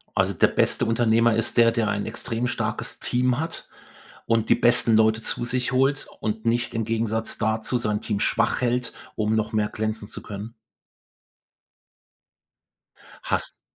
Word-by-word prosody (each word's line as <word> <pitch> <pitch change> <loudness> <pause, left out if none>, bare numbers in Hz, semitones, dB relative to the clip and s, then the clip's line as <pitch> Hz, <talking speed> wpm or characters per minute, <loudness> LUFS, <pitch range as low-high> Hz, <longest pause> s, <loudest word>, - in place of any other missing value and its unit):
Also - - +2
der - - +4
beste - - +1
Unternehmer 115 0 +3
ist 115 +1 +1
der, 115 -1 +6
der 115 -2 0
einen 100 -1 -1
extrem 115 +1 -3
starkes - - -3
Team 125 +1 0
hat 165 +1 -4 0.6
und 115 -1 +1
die - - +6
besten 120 -1 +4
Leute 110 0 +3
zu 120 - -1
sich 125 +1 -1
holt 135 +3 +1
und 110 +1 -3
nicht 120 0 0
im 115 -1 -1
Gegensatz 115 0 -1
dazu 110 +3 0
sein 105 -3 -1
Team 105 -3 -2
schwach 115 +3 +1
hält, 125 0 0 0.2
um 110 0 0
noch 110 +1 -1
mehr 105 -1 +1
glänzen 110 -1 -3
zu - - -8
können. 105 +2 -8 2.7
Hast - - -1
115 Hz, 155 wpm, -24 LUFS, 110-120 Hz, 2.7 s, der